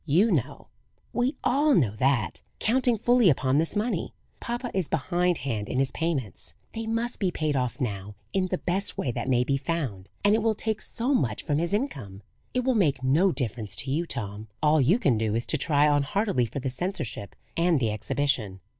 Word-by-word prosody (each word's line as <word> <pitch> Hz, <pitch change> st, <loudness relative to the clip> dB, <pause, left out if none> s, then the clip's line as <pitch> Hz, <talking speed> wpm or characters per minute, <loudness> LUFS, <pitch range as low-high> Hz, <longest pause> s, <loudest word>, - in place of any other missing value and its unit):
"You 185 Hz, +10 st, +4 dB
know 140 Hz, -, -2 dB, 0.4 s
we 250 Hz, +4 st, +1 dB
all 285 Hz, +3 st, +3 dB
know 120 Hz, -, +2 dB
that, 120 Hz, -7 st, +1 dB, 0.2 s
counting 245 Hz, 0 st, +2 dB
fully 240 Hz, -2 st, +4 dB
upon 135 Hz, -1 st, +2 dB
this 165 Hz, +5 st, -1 dB
money, 215 Hz, +4 st, -1 dB, 0.2 s
papa 240 Hz, +1 st, -4 dB
is 190 Hz, -5 st, 0 dB
behindhand 160 Hz, -, 0 dB
in -, -, -2 dB
his 135 Hz, 0 st, +2 dB
payments. 145 Hz, -, -3 dB, 0.2 s
They 225 Hz, 0 st, -4 dB
must 230 Hz, +2 st, -1 dB
be 190 Hz, -, +1 dB
paid 155 Hz, -4 st, -1 dB
off 125 Hz, +1 st, -1 dB
now 105 Hz, -5 st, -3 dB, 0.2 s
in 190 Hz, -1 st, +1 dB
the 185 Hz, -, -1 dB
best 185 Hz, +3 st, -2 dB
way 125 Hz, -, -1 dB
that 130 Hz, -, -3 dB
may 125 Hz, -1 st, +3 dB
be 140 Hz, +2 st, +1 dB
found: 135 Hz, -, -3 dB
and 205 Hz, +1 st, +5 dB
it 220 Hz, -, +3 dB
will 220 Hz, 0 st, +2 dB
take 220 Hz, 0 st, -2 dB
so 250 Hz, +4 st, 0 dB
much 120 Hz, -, 0 dB
from 145 Hz, 0 st, 0 dB
his 170 Hz, +2 st, -1 dB
income. 135 Hz, -, -3 dB, 0.3 s
It 250 Hz, -, 0 dB
will 260 Hz, +1 st, +2 dB
make 145 Hz, -, +2 dB
no 160 Hz, +9 st, +4 dB
difference 115 Hz, -, -2 dB
to 135 Hz, -, -1 dB
you, 165 Hz, +5 st, 0 dB
Tom; 105 Hz, -5 st, -5 dB
all 155 Hz, 0 st, +4 dB
you 160 Hz, -, +4 dB
can 135 Hz, -, +2 dB
do, 110 Hz, -1 st, 0 dB
is 115 Hz, -, -1 dB
to -, -, +1 dB
try 150 Hz, -2 st, +3 dB
on 145 Hz, -1 st, +3 dB
heartily 170 Hz, -, 0 dB
for 140 Hz, -, -5 dB
the 130 Hz, -, -2 dB
seniorship 130 Hz, -, -4 dB, 0.2 s
and 170 Hz, -2 st, +3 dB
the 115 Hz, -4 st, +1 dB
exhibition." 110 Hz, -3 st, -1 dB
150 Hz, 200 wpm, -27 LUFS, 125-200 Hz, 0.4 s, and